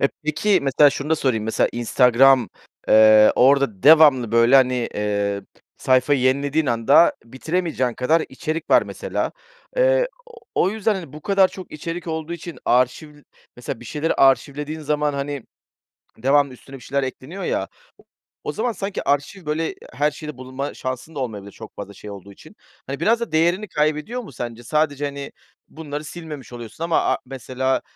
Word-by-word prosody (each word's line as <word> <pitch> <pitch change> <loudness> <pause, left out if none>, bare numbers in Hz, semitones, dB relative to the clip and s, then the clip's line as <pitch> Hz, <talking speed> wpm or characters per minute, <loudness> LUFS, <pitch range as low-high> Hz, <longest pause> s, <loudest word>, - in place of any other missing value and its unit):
Eee, 140 - +3 0.2
peki, 170 +6 +2
mesela 140 +2 +5
şunu 145 +2 -5
da 160 - +3
sorayım, 125 -7 0
mesela 110 - +1
Instagram, 125 0 +4 0.4
eee, 110 0 +7
orada 130 -6 +3
devamlı, 145 -7 +6
böyle, 115 +3 +5
hani, 125 -2 +2
eee, 100 -1 -1 0.3
sayfayı 130 +2 +2
yenilediğin 140 +4 +1
anda 125 +7 +4
bitiremeyeceğin 130 0 -2
kadar 155 +6 +2
içerik 160 +3 -5
var, - - +6
mesela. - - -4 0.4
Eee, - - +3 0.5
o 185 - +2
yüzden, 220 0 0
hani, 170 -8 -7
bu 150 - -10
kadar 195 -2 +3
çok 185 - -11
içerik 165 +3 -6
olduğu 160 0 -4
için 170 0 -8
arşiv, 130 +5 +1 0.4
mesela, 125 0 -6
bir 120 - -12
şeyleri 150 +6 -2
arşivlediğin 145 +3 +1
zaman, 150 0 0
hani, 140 -1 -4 0.8
devamlı 140 +3 +2
üstüne 135 +2 -12
bir - - -14
şeyler 140 +2 -2
ekleniyor 135 +8 -6
ya - - -1
o - - -16 0.8
o - - -3
zaman 235 +2 -1
sanki 195 -1 -4
arşiv 145 +5 -1
böyle 160 +2 -2 0.2
her 145 +5 +1
şeyde 150 -1 -8
bulunma 130 +2 -6
şansın 130 +5 -6
da - - -6
olmayabilir 105 -5 -5
çok 110 - -12
fazla 100 0 -8
şey 105 - -10
olduğu 100 0 -10
için. - - -17 0.3
Hani, 140 +2 -5
biraz 230 +7 +2
da 235 - -4
değerini 175 +6 +1
kaybediyor 155 +10 -1
mu 205 - -12
sence? 120 0 -6
Sadece, 145 +1 0
hani, 140 -1 -5 0.4
bunları 150 -1 -7
silmemiş 155 -5 -9
oluyorsun 120 +7 -7
ama 170 - +2
a - - -1
mesela, 130 0 -2
140 Hz, 165 wpm, -21 LUFS, 125-160 Hz, 0.8 s, eee